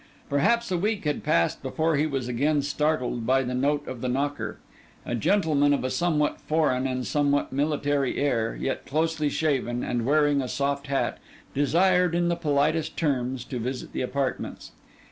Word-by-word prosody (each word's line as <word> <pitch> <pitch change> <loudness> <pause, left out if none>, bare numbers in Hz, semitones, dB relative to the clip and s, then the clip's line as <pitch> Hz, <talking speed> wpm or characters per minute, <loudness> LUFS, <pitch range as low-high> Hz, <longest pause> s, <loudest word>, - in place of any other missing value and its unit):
Perhaps 230 +11 +2
a 180 - +1
week 210 +2 -1
had 150 -1 -1
passed 85 0 +1
before 155 +4 0
he 150 +2 +2
was 135 -4 -3
again 140 +4 +1
startled 140 -4 0
by 135 +1 +3
the 125 0 -3
note 145 +3 0
of 125 -2 -6
the 130 - -1
knocker. 130 -4 -2 0.5
A - - -3
gentleman 145 - +3
of - - -3
a 130 - -1
somewhat 155 -4 0
foreign 150 -5 +1
and 130 -1 -2
somewhat 145 -2 +1
military 145 -1 0
air, 120 -6 0
yet 135 - -3
closely 155 0 0
shaven 130 -6 0
and 120 -1 -1
wearing 145 +1 +3
a 130 - -3
soft 140 +2 -2
hat, 135 0 -1 0.3
desired 180 +4 +3
in 175 0 +2
the 170 - +1
politest 155 0 0
terms 130 -5 -1
to 125 - -5
visit 125 +2 -4
the - - -2
apartments. 130 +1 -3
145 Hz, 170 wpm, -26 LUFS, 130-155 Hz, 0.5 s, by